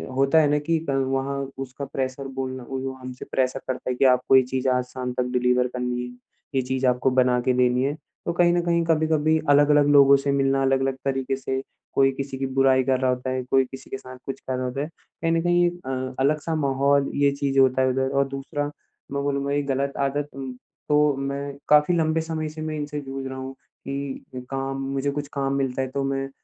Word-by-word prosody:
होता 135 +4 +3
हैं 150 - +4
ना 150 - +3
कि 165 +2 0
क - - +2 0.2
वहाँ 135 +1 -1 0.2
उसका 135 +1 -5
प्रेशर 135 0 -4
बोलना 130 -1 -4
वो 135 0 -3
हमसे 130 -1 -9
प्रेशर 130 0 0
करता 130 0 -3
हैं 125 - -2
कि 135 - +3
आपको 125 +1 +4
ये 130 - +8
चीज़ 130 +1 -2
आज 125 0 +2
शाम 125 0 -5
तक 125 - 0
डिलीवर 125 0 +2
करनी 125 0 -3
हैं। 125 0 -10 0.4
ये 130 - +3
चीज़ 130 +1 -2
आपको 125 +1 +2
बना 125 -1 +3
के 130 - +3
देनी 125 0 +2
हैं, 145 +2 0 0.3
तो 170 - -1
कहीं 175 0 +4
न 175 - +2
कहीं-कभी 160 -2 +2
अलग-अलग 145 0 +5
लोगों 140 -1 +7
से 140 0 -1
मिलना, 135 0 +2
अलग-अलग 135 0 +1
तरीके 135 -1 0
से 130 0 -3 0.3
कोई 135 0 +4
किसी 135 0 -5
की 135 - -2
बुराई 130 0 +3
कर 130 0 +1
रहा 130 -1 +1
होता 125 +1 -3
हैं, 130 0 -2
कोई 135 -1 +4
किसी 135 - -10
के 135 - -4
साथ 130 0 -11
कुछ 135 0 -5
कर 130 - -4
रहा 130 0 -2
होता 125 +3 -3
हैं। 150 - -3 0.3
कहीं 165 - +2
न 165 0 +2
कहीं 175 0 +3
अ, 130 -6 -5
अलग-सा 155 +4 +1
माहौल 140 -1 +2
ये 140 0 +3
चीज़ें 140 -1 +1
होता 130 0 +3
हैं 130 - +3
उधर 130 +1 0
और 140 - +2
दूसरा 140 +2 -4 0.5
मैं 140 0 -2
बोलूँगा 140 0 -1
ये 145 - +2
गलत 140 +1 -2
आदत 145 +1 -3 0.6
तो 150 -1 +4
मैं 140 +1 -4
काफ़ी 150 +3 +5
लम्बे 160 0 +1
समय 160 -1 -3
से 155 +1 -8
मैं 155 0 -3
इनसे 150 0 -4
जूझ 135 0 -6
रहा 130 0 -6
हूँ 130 0 -6 0.3
कि 140 0 -4 0.2
काम 135 0 -3 0.2
मुझे 140 +1 0
कुछ 145 0 -4
काम 135 -1 -1
मिलता 135 -1 -1
हैं 130 - -2
तो 140 0 -1
मैं 135 0 -2
135 Hz, 220 wpm, -24 LUFS, 130-145 Hz, 0.6 s, ये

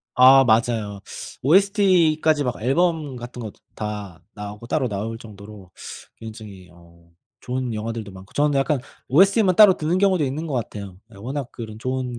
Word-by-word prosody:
아 130 +1 +7
맞아요. 110 -3 +1 0.4
OST까지 170 - +3
막 125 - -3
앨범 155 0 0
같은 120 0 -8
것도 110 -3 -7 0.2
다 105 -5 -6
나오고 105 +2 -8
따로 130 +1 0
나올 110 +2 -4
정도로 100 -3 -13 0.5
굉장히 110 -5 -11
어 85 -1 -21 0.3
좋은 125 -1 -3
영화들도 110 -1 -5
많고 95 0 -14
저는 145 -1 +2
약간 140 0 0 0.3
OST만 195 - +4
따로 205 -4 +7
듣는 160 +4 0
경우도 190 -5 +2
있는 145 +5 -3
것 145 - -4
같아요. 100 -5 -5 0.2
예 - - -14
워낙 130 +5 -5
그런 110 -3 -8
좋은 130 0 -3
125 Hz, 330 characters per minute, -22 LUFS, 105-150 Hz, 0.5 s, 아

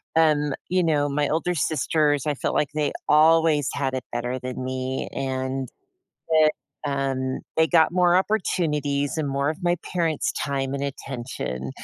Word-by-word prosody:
um, 150 -3 +3 0.2
you 185 0 +2
know, 150 -3 +2
my 145 0 0
older 170 +3 0
sisters, 150 -2 +1
I 150 - +1
felt - - -2
like 145 - +1
they 150 -1 0 0.2
always 155 -2 +4
had 135 -2 -1
it 130 - -3
better 120 +2 -2
than 130 0 -5
me, 130 0 -3
and 130 0 -2 0.6
that, 155 -1 +5 0.4
um, 135 -2 -1 0.2
they 160 - +5
got 160 -1 +4
more 180 -1 +4
opportunities 150 -8 0
and 145 -2 -1
more 140 +1 0
of 160 - -7
my 175 0 +2 0.2
parents' 165 -4 0
time 135 -1 -2
and 140 - -3
attention, 120 - -5
145 Hz, 155 wpm, -24 LUFS, 130-160 Hz, 0.6 s, that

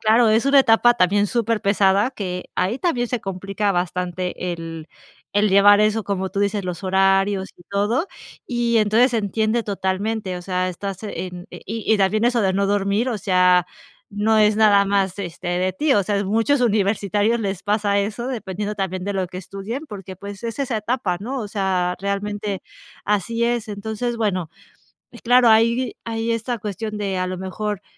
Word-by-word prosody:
claro, 225 +1 +4
es 225 +5 +2
una 275 0 +6
etapa 240 -1 +4
también 205 0 +2
superpesada, 205 -2 +2
que 180 -7 -5
ahí 215 +8 0
también 245 -9 0
se 245 0 -3
complica 195 +2 -2
bastante 180 0 -2
el 165 -1 -8 0.4
el 205 +1 +3
llevar 205 +1 +7
eso, 215 +1 +2
como 190 -1 -2
tú 200 - -2
dices, 200 -1 0
los 180 +1 -5
horarios 195 +1 +2
y 175 - -17
todo. 210 - 0 0.4
Y 235 -2 +1
entonces, 225 +4 +3
se 230 - +2
entiende 220 +3 0
totalmente, 195 0 -2
o - - -10
sea, 185 0 -1
estás 195 +2 -6
en 180 -4 -6
y 225 +2 -7
y - - 0
también 210 +3 +2
eso 240 -1 +2
de 190 -2 +1
no 200 +1 +1
dormir, 205 +4 +1
o 220 - -2
sea, 180 -3 +3 0.5
no 215 +2 +2
es 210 0 +4
nada 205 -2 +5
más, 195 -2 +1
este, 175 -2 -7
de 180 +1 0
ti. 295 +10 +1
O 200 - +3
sea, 200 +1 -1
muchos 225 +8 +1
universitarios 205 0 +1
les 195 -4 -3
pasa 205 -1 +1
eso, 215 +4 -3
dependiendo 210 -4 -4
también 190 -2 -3
de 200 - -2
lo 190 -2 -2
que 180 - -7
estudian, 195 - -6
porque, 195 -4 -9
pues, 200 +1 -9
es 230 0 -5
esa 260 -4 -1
etapa, 210 -4 -1
¿no?, 255 +6 -4
o 220 - -4
sea, 190 -3 0
realmente 200 0 -3 0.4
así 210 +3 0
es. 235 -2 -1
Entonces, 220 +4 -3
bueno, 185 -7 -1 0.7
claro, 245 0 +5
hay 230 +3 +3
hay 225 0 -2
esta 230 +2 -2
cuestión 210 +1 -5
de 195 -3 -2
a 185 - -1
lo 185 0 -4
mejor 200 +2 -4
205 Hz, 180 wpm, -21 LUFS, 190-225 Hz, 0.7 s, llevar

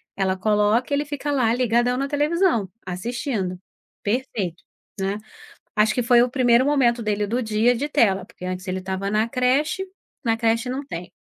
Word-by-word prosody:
ela 190 -1 0
coloca, 210 +6 +2
ele 285 +1 +2
fica 290 0 -3
lá 250 -5 +2
ligadão 245 0 +2
na 275 +1 -1
televisão, 295 - +1 0.2
assistindo, 190 0 -3 0.4
perfeito, 205 -6 -2 0.4
né. 195 +1 -1 0.6
Acho 215 -1 +3
que 250 - +1
foi 240 0 +5
o 250 - +2
primeiro 250 -1 +3
momento 250 -5 +2
dele 210 -1 0
do 240 +5 -1
dia 220 +2 +2
de 280 +5 -2
tela, 200 -11 +2
porque 210 -4 -12
antes 185 +1 -4
ele 185 0 -2
estava 190 +1 -3
na 215 +2 +2
creche, 275 +9 +1 0.4
na 225 -1 +2
creche 230 +1 +1
não 265 +3 -3
tem. 175 -9 -7
230 Hz, 170 wpm, -23 LUFS, 200-255 Hz, 0.6 s, foi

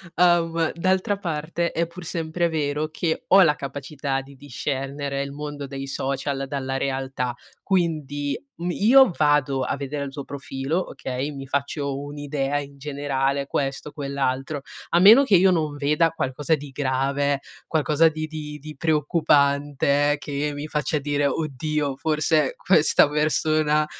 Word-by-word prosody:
uhm, 170 -2 +3
d'altra 185 +3 +1
parte, 170 -1 -2
è 170 - 0
pur 170 +2 -11
sempre 165 +1 -1
vero 150 -1 -1
che 160 +1 -2
ho 195 +1 +7
la 155 -4 +4
capacità 140 0 -4
di 140 +1 -14
discernere 140 +1 -4
il 140 0 -4
mondo 145 0 -6
dei 135 0 -6
social 135 0 -2
dalla 135 -1 -3
realtà, 130 -2 -2 0.3
quindi 150 -6 -1 0.2
m 175 +1 -2
io 245 +6 +6
vado 145 -3 +2
a 130 - -1
vedere 140 +1 -4
il 135 - -7
tuo 140 0 -6
profilo, 140 +5 -3
okay, 135 +1 -4
mi 135 -1 -7
faccio 140 0 -2
un'idea 145 -1 -3
in 140 -1 -9
generale, 140 -1 -1
questo, 140 +1 -3
quell'altro, 140 0 -2 0.3
a 170 - +3
meno 220 +9 +9
che 240 -8 +4
io 185 +1 +6
non 155 -4 0
veda 150 +3 +2
qualcosa 150 0 -1
di 145 -1 -9
grave, 140 +1 0 0.3
qualcosa 155 0 +3
di 155 0 -4
di 150 -1 -7
di 150 +1 -10
preoccupante 145 -2 +2
che 145 +1 -3
mi 145 +1 -5
faccia 150 0 -1
dire: 145 0 0
"Oddio, 150 -1 -2
forse 155 -1 +1
questa 160 -5 +4
persona 155 0 +2
145 Hz, 145 wpm, -24 LUFS, 140-155 Hz, 0.3 s, meno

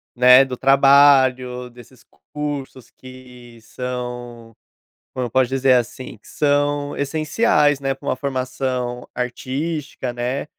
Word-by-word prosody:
né, 125 +2 +7
do 130 -2 -6
trabalho, 135 -2 +4
desses 125 +1 -17 0.3
cursos 145 -4 -6
que 125 -2 -15
são, 120 -1 -7 0.6
como 130 - -3
eu 120 - -5
posso 130 -1 +2
dizer 135 0 +2
assim? 125 -1 -2
Que - - -23
são 145 0 0
essenciais, 150 0 +1
né, 135 0 -1
pra 140 +1 -13
uma - - 0
formação 130 -2 -4
artística, 130 +2 -4
né. 125 +4 -3
130 Hz, 120 wpm, -20 LUFS, 125-140 Hz, 0.6 s, né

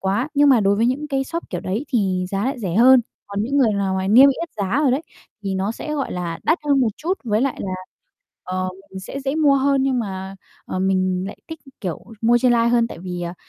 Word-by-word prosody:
quá, 205 +9 0
nhưng 285 0 +5
mà 250 -5 +5
đối 200 0 +2
với 225 +3 +2
những 280 +5 -1
cái 270 -2 0
shop 335 +4 -6
kiểu 180 - -3
đấy 210 +9 -3
thì 190 -6 0
giá 195 +1 -1
lại 265 +1 -2
rẻ 185 -7 -3
hơn, 255 +3 +7 0.3
còn 200 0 -3
những 275 +5 -1
người 245 -6 +4
nào 200 -2 -1
mà 190 0 -1
niêm 255 +7 +8
yết 335 +5 -2
giá 205 +6 0
rồi 280 - +3
đấy, 270 +6 0 0.4
thì 195 -1 -2
nó 195 +3 -1
sẽ, 300 +6 -5
gọi 280 -2 -2
là, 175 -2 -4
đắt 320 +3 +2
hơn 280 -2 +3
một 240 - +3
chút 360 +5 -2
với 215 -1 +1
lại 270 0 0
là 190 - -3 0.7
ờ, 185 0 -2 0.2
mình 190 0 -8
sẽ 275 +8 -7
dễ 270 +1 -2
mua 300 -3 +4
hơn. 275 0 +2
Nhưng 265 -2 +1
mà, 190 -3 -5 0.3
ờ, 185 - -4
mình 185 -1 +1
lại 205 - -7
thích, 320 0 -7 0.2
kiểu, 180 -6 -5 0.2
mua 235 +1 +4
trên 245 0 +3
live 235 0 +3
hơn 235 -1 +3
tại - - -9
vì, 180 0 -5
à, 170 0 -4
230 Hz, 255 wpm, -21 LUFS, 190-270 Hz, 0.7 s, niêm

